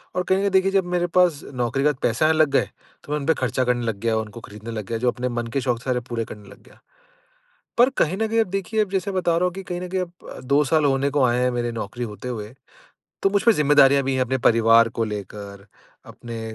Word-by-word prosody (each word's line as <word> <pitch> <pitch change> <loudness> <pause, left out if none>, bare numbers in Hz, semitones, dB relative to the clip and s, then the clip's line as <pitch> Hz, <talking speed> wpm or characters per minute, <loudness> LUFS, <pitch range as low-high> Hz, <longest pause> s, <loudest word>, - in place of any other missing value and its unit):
और 180 - 0
कहीं 190 +1 +1
न - - -1
कहीं 200 - +1
देखिए 190 0 +3
जब 195 -2 +2
मेरे 175 0 +1
पास 175 -4 +2
नौकरी 125 +2 -1
के - - +4
बाद 145 - -1
पैसे 115 +6 +1
आने 160 - +4
लग 155 -2 +4
गए, - - +1 0.3
तो - - -10
मैं 150 - 0
उनपे 150 +3 +2
खर्चा 130 -2 -1
करने 120 -1 0
लग 110 -3 -3
गया 115 0 0
और - - +1
उनको 105 +2 -11
खरीदने 110 +2 -9
लग 110 -3 -5
गया 115 - -3
जो 125 +2 +1
अपने 125 +1 -3
मन 120 -1 -3
के 135 - +1
शौक 125 -2 -1
थे - - -16
सारे 130 -1 0
अब - - -14
पूरे 115 -2 -2
करने 105 -2 -11
लग - - -15
गया। - - -21 1.0
पर 245 +2 +6
कहीं 170 +4 +2
न 220 +2 0
कहीं 225 +1 +2
अब 225 - +2
देखिए 195 +3 -1
अब 195 - -16
जैसे 195 +1 -1
मैं 185 - 0
बता 170 -2 +1
रहा 175 - +1
हूँ 180 - 0
कि 195 - -6
कहीं 180 -1 -5
न 180 - -5
कहीं 185 +1 -2
अब 175 -1 -5 0.2
अ, - - -9
2 140 +3 +2
साल 155 +2 +2
होने 140 0 +1
को 145 -1 +1
आएँ 120 0 +2
हैं 125 - +2
मेरी 120 -1 -2
नौकरी 115 +2 -5
होते 105 +2 -7
हुए, 110 -1 -6 0.7
तो 195 - +4
मुझपे 205 +3 +3
जिम्मेदारियाँ 140 -3 +4
भी 135 0 -1
है 130 - 0
अपने 130 +1 0
परिवार 115 0 +5
को - - +3
लेकर, 100 -1 -7 0.4
अपने 115 -1 -8
130 Hz, 280 wpm, -23 LUFS, 115-175 Hz, 1.0 s, पर